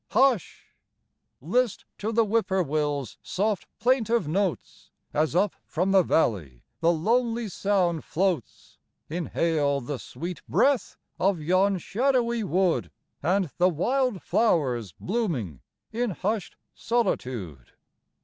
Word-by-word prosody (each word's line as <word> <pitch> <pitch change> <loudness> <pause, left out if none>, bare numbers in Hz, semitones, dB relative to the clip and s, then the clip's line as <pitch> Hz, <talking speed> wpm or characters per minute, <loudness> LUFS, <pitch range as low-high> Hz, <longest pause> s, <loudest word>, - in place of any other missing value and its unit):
Hush! 260 - +2 0.7
list 220 - 0
to 215 +2 -2
the 230 0 +3
Whip 220 0 +1
poor 190 -1 +1
will's 145 - -2
soft 205 0 -1
plaintive 235 - +2
notes, 185 +2 -2 0.2
As 155 +2 +1
up 195 +2 +3
from 180 +4 0
the 195 -1 +6
valley 95 - 0 0.2
the 165 +1 +4
lonely 230 +7 +1
sound 180 -4 0
floats, 180 - -2 0.3
Inhale 160 -4 0
the 135 +1 -5
sweet 170 +5 -6
breath 275 -3 +2 0.2
of 190 -1 +2
yon 185 +5 +2
shadowy 235 +3 +1
wood 185 -2 +1 0.3
And 180 0 +1
the 180 +1 +5
wild 245 - 0
flowers 130 - +1
blooming 165 - -2 0.3
in 240 +2 -1
hushed 200 +2 -2 0.2
solitude. 125 - -2
185 Hz, 115 wpm, -26 LUFS, 155-225 Hz, 0.7 s, the